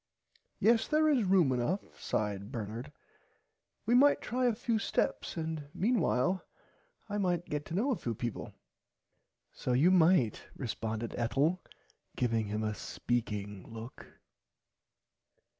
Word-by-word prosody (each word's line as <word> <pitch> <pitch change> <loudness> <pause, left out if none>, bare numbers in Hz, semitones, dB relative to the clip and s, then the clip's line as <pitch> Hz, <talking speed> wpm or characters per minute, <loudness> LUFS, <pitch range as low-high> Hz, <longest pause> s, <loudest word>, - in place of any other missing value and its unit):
Yes 225 0 +3
there 310 +1 +3
is 275 -7 +3
room 180 -7 +4
enough 130 +11 -2
sighed 105 0 -2
Bernard 115 +3 -5 0.9
we 230 - +2
might 285 +4 +6
try 250 +1 0
a 235 - +2
few 225 0 0
steps 200 - -1
and 160 -2 -3
meanwhile 190 - +1 0.6
I 205 0 -2
might 175 -3 0
get 150 0 -2
to 165 - -5
know 245 +9 +1
a - - +2
few 120 - -4
peaple. 120 0 -4 1.0
So 125 - -2
you 150 +9 +5
might 165 - +4
responded 115 -2 -3
Ethel 145 +9 +1 0.5
giving 115 -3 0
him 105 +1 -2
a 110 0 -1
speaking 105 -4 -3
look. 115 +3 -9
145 Hz, 125 wpm, -32 LUFS, -, 1.0 s, might